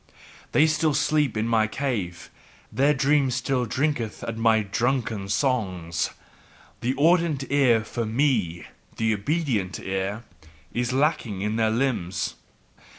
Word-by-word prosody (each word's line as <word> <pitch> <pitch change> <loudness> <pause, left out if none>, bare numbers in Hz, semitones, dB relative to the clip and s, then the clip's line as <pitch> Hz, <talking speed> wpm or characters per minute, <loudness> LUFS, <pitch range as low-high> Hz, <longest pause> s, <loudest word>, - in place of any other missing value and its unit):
They 150 - +5
still 155 -1 +1
sleep 150 -7 +1
in 110 +1 0
my 110 -2 +3
cave; 110 -9 -3 0.4
their 140 +3 +3
dream 140 0 +3
still 125 0 -1
drinketh 130 -3 -1
at 115 - -4
my 110 -1 +3
drunken 110 -1 -1
songs. 95 - 0 0.7
The 125 +3 -1
audient 160 -2 +2
ear 125 -6 +4
for 115 +1 -3
ME 110 - 0 0.3
the 110 -1 +2
OBEDIENT 110 - -1
ear, 95 +3 -3 0.5
is 120 +1 -1
yet 130 - 0
lacking 130 - 0
in 105 +1 -1
their 110 -1 +2
limbs." 110 -7 -1
120 Hz, 130 wpm, -25 LUFS, 105-140 Hz, 0.7 s, They